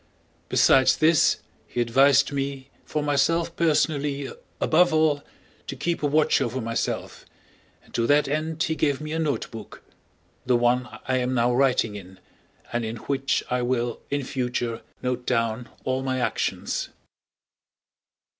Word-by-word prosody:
Besides 130 -1 +5
this 160 -1 +4 0.3
he - - -5
advised 135 +4 +4
me 140 -1 -4
for 150 - -2
myself 165 +4 +1
personally 145 -4 0 0.3
above 175 +3 +4
all 155 -2 +2 0.4
to - - -4
keep 170 -1 -2
a 145 - +2
watch 150 +2 +3
over 120 +2 -1
myself, 115 -1 -3 0.6
and - - -23
to 115 0 0
that 145 +1 +4
end 155 +2 -1
he 165 - 0
gave 145 -3 0
me 155 0 -6
a 160 - -1
notebook, 130 -8 -4 0.6
the 125 - +2
one 120 0 +2 0.2
I 130 -1 +1
am 125 0 0
now 120 0 +2
writing 125 -4 +2
in 95 -1 -11 0.5
and 120 0 0
in 110 +1 -4
which 135 +3 -1
I 125 0 +1
will 120 -1 -1
in 140 0 -1
future 125 -3 -2 0.2
note 125 -1 -2
down 115 -1 0
all 130 0 -1
my 130 -1 -1
actions. 125 - -2
135 Hz, 145 wpm, -25 LUFS, 120-150 Hz, 0.6 s, Besides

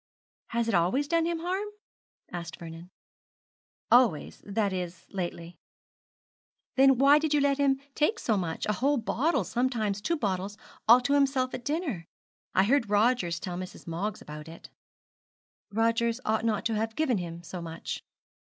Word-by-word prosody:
'Has 235 0 -1
it 230 - 0
always 190 +12 +2
done 330 +1 +2
him 340 -1 -2
harm?' 375 +4 -2 0.6
asked 175 -1 -6
Vernon. 165 +1 -9 1.0
'Always; 235 -11 +3
that 200 -1 0
is, 180 -1 -5
lately.' 175 -2 -5 1.2
'Then 270 -1 +6
why 280 +3 +6
did 305 -1 +1
you - - +4
let 280 0 +2
him 275 -1 +3
take 310 +11 +1
so 225 - 0
much 170 -4 -2
a 210 - +1
whole 280 +6 +1
bottle, 270 +7 +1
sometimes 230 -5 -1
two 335 +9 0
bottles 200 -3 -2 0.3
all 240 +3 +8
to 280 +3 +1
himself 270 -2 +2
at 245 - -5
dinner? 285 - -2 0.5
I 190 - +5
heard 230 0 +2
Rogers 205 -5 +2
tell 180 0 -5
Mrs. 185 0 -8
Moggs 175 +6 -3
about 150 +1 -9
it.' 165 +1 -12 1.0
'Rogers 230 +2 +1
ought 220 +1 +1
not 215 -2 0
to 225 - +1
have 220 +1 -2
given 260 -9 +1
him 170 -1 -6
so 175 +1 -7
much.' 165 -1 -6
225 Hz, 160 wpm, -28 LUFS, 180-275 Hz, 1.2 s, all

